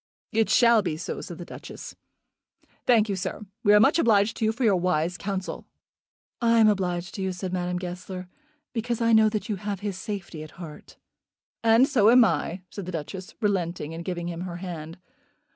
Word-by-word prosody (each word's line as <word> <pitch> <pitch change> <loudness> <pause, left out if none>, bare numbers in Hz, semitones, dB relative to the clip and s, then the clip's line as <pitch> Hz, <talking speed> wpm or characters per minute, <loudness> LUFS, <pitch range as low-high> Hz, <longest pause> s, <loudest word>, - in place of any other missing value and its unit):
"It 225 0 +2
shall 235 -2 +5
be 165 -6 -3
so," - - -5
said 175 - -8
the 175 - -8
Duchess. - - -9 0.9
"Thank 225 -3 +5
you, 200 - -1
sir. 190 +3 -4 0.2
We 205 - +5
are - - +7
much 280 +10 +4
obliged 215 -4 +3
to 225 - 0
you 220 - +3
for 240 +4 -4
your 210 -4 +4
wise 175 -1 0
counsel." 190 +1 -4 0.7
"I 230 -1 +4
am 220 -1 +6
obliged 185 -3 0
to 195 - -5
you," 190 0 -1
said 185 0 -5
Madame 180 0 -1
Goesler, 180 +1 -6 0.5
"because 235 0 -2
I 230 -1 +3
know 220 -1 +6
that 210 -2 -3
you 210 - -2
have 200 0 -4
his 200 -3 -4
safety 190 -7 -6
at 155 - -11
heart." 165 -4 -10 0.7
"And 230 +3 +5
so 225 -7 +4
am 245 0 +7
I," 180 -3 -1
said 200 -4 -7
the - - -4
Duchess, 180 +4 -6
relenting, 175 -6 -1
and 165 +1 -6
giving 175 -1 -4
him 170 0 -5
her 180 -1 -5
hand. 170 -3 -7
190 Hz, 195 wpm, -26 LUFS, 175-220 Hz, 0.9 s, are